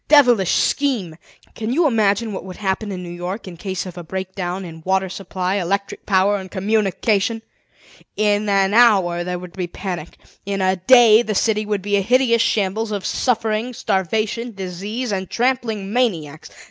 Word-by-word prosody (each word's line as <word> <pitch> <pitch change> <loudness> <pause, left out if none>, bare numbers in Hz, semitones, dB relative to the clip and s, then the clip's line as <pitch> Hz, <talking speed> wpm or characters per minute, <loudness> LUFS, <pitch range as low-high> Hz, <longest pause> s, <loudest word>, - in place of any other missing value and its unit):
Devilish 245 - +5
scheme! 240 - 0 0.4
"Can 220 +1 -4
you 325 +6 +2
imagine 220 -3 +1
what - - -5
would 185 -1 -9
happen 200 +1 -2
in 180 -1 -5
New 175 - -7
York 180 +4 -5
in 180 - -8
case 185 +1 -4
of 180 -1 -8
a - - -7
break 190 +2 -5
down 185 0 -4
in 160 -1 -10
water 190 +1 0
supply, 190 0 -3
electric 200 +2 -3
power, 200 +1 +3
and 190 -1 -8
communication? 210 +2 0 0.7
In 210 0 +1
an 195 0 +2
hour 195 -7 +4
there 180 0 -3
would 180 0 -10
be 185 -1 -3
a - - -9
panic; 175 -3 -6 0.3
in 200 0 -3
a 185 0 +2
day 230 +2 +6
the 215 -3 -3
city 215 0 +1
would 205 -3 -1
be 205 0 +1
a - - +2
hideous 235 +2 +3
shambles 215 +1 0
of 200 -2 -3
suffering, 230 0 -1
starvation, 215 +4 -1
disease, 200 +6 -4
and 190 -2 -3
trampling 230 -5 -1
maniacs. 165 - -1
200 Hz, 175 wpm, -20 LUFS, 185-225 Hz, 0.7 s, day